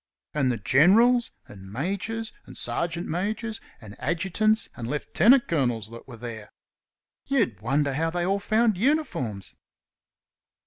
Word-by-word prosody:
And 135 -4 +2
the 120 - -2
generals, 230 - +4 0.2
and 95 -1 -12
majors, 200 - -3
and - - -11
sergeant 170 0 -2
majors, 215 +6 -3 0.2
and 105 -4 -11
adjutants 190 +9 +1
and 115 - -6
lieutenant 215 - +3
colonels 120 -9 0
that 115 +2 -11
were 120 -3 -10
there! 115 -2 -7 0.8
You'd 225 - +1
wonder 140 +4 +1
how 165 +4 0
they 175 +1 -1
all 195 +2 +1
found 220 -1 +2
uniforms. 200 - -1
165 Hz, 130 wpm, -26 LUFS, -, 0.8 s, generals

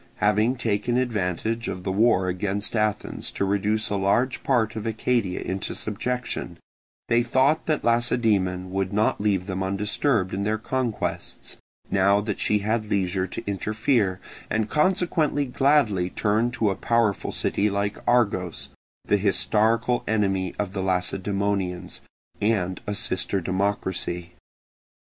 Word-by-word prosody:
Having 105 +5 +2
taken 120 0 0
advantage 115 -1 -1
of 90 - -4
the 95 - -1
war 100 -2 +3
against 100 +4 -2
Athens 105 -1 -1
to 100 - -1
reduce 105 +2 0
a - - +1
large 120 +7 +1
part 115 -5 +1
of 110 0 -4
Arcadia 110 -3 0
into 95 +1 -3
subjection, 110 -4 -3 0.5
they 120 0 +3
thought 130 +6 +2
that 155 -2 0
Lacedaemon 105 -6 +1
would 95 0 -1
not 105 0 +1
leave 100 -3 +1
them 95 -1 -3
undisturbed 100 +2 0
in 95 - -2
their 105 +2 0
conquests, 125 0 -3 0.3
now 100 +1 +4
that 105 -1 -3
she 105 - +2
had 110 -1 0
leisure 95 -2 0
to 115 +5 -7
interfere, 105 0 0 0.3
and 110 -1 -1
consequently 155 -3 +2
gladly 125 -9 +2
turned 110 +5 +1
to 115 -5 +1
a - - -2
powerful 115 -2 +1
city 105 +1 0
like 100 +1 -2
Argos, 100 -8 +1 0.4
the 105 - +3
historical 110 +4 +2
enemy 95 -4 0
of 100 -2 -2
the 95 - -2
Lacedaemonians, 95 0 -1 0.4
and 95 -4 0
a 105 - -1
sister 100 -2 0
democracy. 95 -2 -2
105 Hz, 135 wpm, -25 LUFS, 95-115 Hz, 0.5 s, now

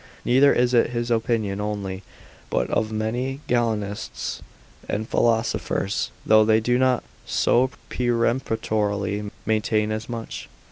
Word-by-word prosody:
Neither 135 +3 +5
is 125 0 +2
it 120 - +4
his 120 0 -2
opinion 110 -3 0
only, 100 -2 -3 0.5
but - - 0
of 110 0 0
many 120 +5 -2
Galenists 110 -4 -2 0.5
and 110 +2 -2
philosophers, 110 -4 0 0.2
though 110 0 +6
they 110 0 +4
do 120 +2 +1
not 130 -1 +2 0.2
so 130 +2 +3 0.2
peremptorily 110 -4 0 0.2
maintain 110 0 +1
as 110 +2 -4
much. 115 -1 -6
110 Hz, 120 wpm, -24 LUFS, 105-120 Hz, 0.5 s, though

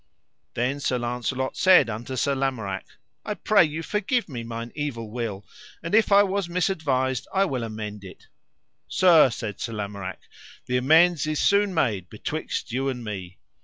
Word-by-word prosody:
Then 130 +4 -1
Sir 130 -2 0
Launcelot 125 +2 -2
said 185 -9 +6
unto 115 +4 -5
Sir 140 +2 +1
Lamorak. 130 -8 -2 0.4
I 210 - -3
pray 210 -2 +4
you 160 +1 -3
forgive 215 +6 -1
me 125 -7 -6
mine 115 0 -6
evil 120 -7 -4
will, 110 -4 -4 0.4
and 165 - -5
if 220 -1 +4
I 200 0 +7
was 195 -2 -1
misadvised 150 -8 0
I 195 0 +2
will 130 -9 -2
amend 105 -2 -6
it. 95 - -12 0.6
Sir, 165 -7 +6
said 110 -3 -5
Sir 115 - -4
Lamorak, 100 -3 -5 0.5
the 125 - 0
amends 160 +4 +4
is 155 -1 -1
soon 200 0 +3
made 105 - 0
betwixt - - -4
you 135 +3 -1
and 125 -2 -5
me. 95 -4 -6
130 Hz, 165 wpm, -25 LUFS, 115-165 Hz, 0.6 s, I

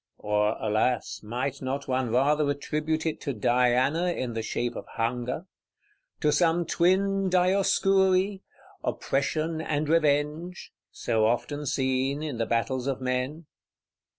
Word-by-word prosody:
Or, 105 +1 0
alas, 110 +3 0
might 125 +5 -3
not 135 +1 -3
one 130 -2 0
rather 145 +5 +2
attribute 150 +3 -2
it 160 - -2
to 140 - -3
Diana 125 - +2
in 125 -8 -3
the 115 - -2
shape 120 +2 -2
of - - -7
Hunger? 120 +7 -2 0.8
To 150 - +3
some 165 +3 +2
twin 195 +3 +2
Dioscuri, 190 +1 +3 0.4
OPPRESSION 155 +4 -1
and 150 -1 -1
REVENGE; 155 +2 0 0.2
so 110 -2 0
often 145 +5 -2
seen 130 +2 0
in 145 -7 -4
the 115 - 0
battles 125 +3 -1
of 135 -2 -1
men? 130 +5 -2
140 Hz, 125 wpm, -27 LUFS, 125-165 Hz, 0.8 s, To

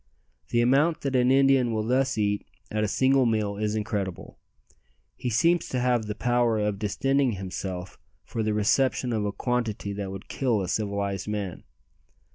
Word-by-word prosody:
The 120 - +2
amount 140 +7 +3
that 135 -2 -2
an 125 0 +4
Indian 135 -2 +4
will 110 -1 -1
thus 130 +1 +1
eat 105 -1 0 0.3
at 110 0 0
a - - +1
single 130 +4 +3
meal 105 -3 0
is 105 0 -1
incredible. 105 -4 -4 0.8
He 125 - -3
seems 165 +9 +2
to 125 - -1
have 120 -3 +1
the 105 - -3
power 120 -2 +1
of 105 -2 -1
distending 135 +5 +1
himself 95 -1 -6 0.2
for 115 - -4
the 110 -1 0
reception 125 +3 +2
of 105 -2 0
a 100 - -1
quantity 115 -2 -2
that 100 -1 -4
would 95 0 -8
kill 120 -6 0
a - - -4
civilized 100 -1 -2
man. 105 -4 -4
110 Hz, 170 wpm, -26 LUFS, 100-125 Hz, 0.8 s, an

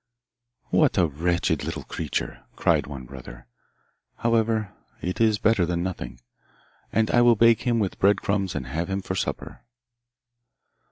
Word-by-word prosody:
'What - - +3
a 90 - +5
wretched 85 +3 0
little - - -4
creature!' - - -4
cried - - +2
one 65 -3 -7
brother. - - -11 0.7
'However, 115 -3 +1 0.3
it 90 +5 -3
is 110 -2 +4
better 110 -3 +3
than 85 0 -1
nothing, 65 -10 -5 0.7
and 110 0 +1
I 120 - +5
will 120 -1 +6
bake 115 +1 +5
him 120 -1 +2
with 100 -4 -1
bread 100 +1 +4
crumbs 100 -2 -1
and 70 -4 -3
have 80 +8 -3
him 95 0 -2
for 95 - -3
supper. 95 - -4
95 Hz, 150 wpm, -25 LUFS, 85-110 Hz, 0.7 s, will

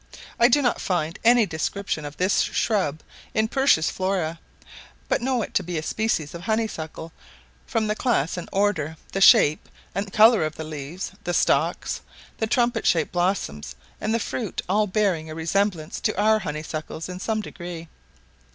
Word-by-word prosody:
I 235 - +7
do 285 +3 +3
not 245 - +1
find 165 -3 -1
any 235 0 +6
description 170 -1 -3
of 145 0 -8
this 185 +2 +2
shrub 170 -9 0 0.3
in 220 0 +2
Pursh's 265 - +3
Flora, 185 -4 -1 0.7
but - - +1
know 250 -2 0
it - - -8
to - - +2
be 175 -1 -4
a 155 - -3
species 190 -7 -1
of 170 - -7
honeysuckle, 170 -7 -3 0.5
from 225 -1 0
the 210 - +1
class 215 - 0
and 180 - -6
order, 180 -6 0
the 195 - -2
shape 155 -5 +6 0.2
and 195 +1 -3
colour 220 -1 +6
of 155 0 -3
the 160 - -6
leaves, 155 +3 -6
the 175 - -1
stalks, - - +1 0.4
the 220 - 0
trumpet 240 -1 +1
shaped 165 -3 +2
blossom 175 - 0 0.4
and 215 - -1
the 230 - +2
fruit; 225 -3 -3
all 210 +3 +2
bearing 185 -6 0
a 155 - -6
resemblance 165 0 -1
to - - -1
our 215 +1 +4
honeysuckles 155 -1 -5
in 180 0 -7
some 220 +2 -1
degree. 175 -4 -8
185 Hz, 170 wpm, -24 LUFS, 160-220 Hz, 0.7 s, I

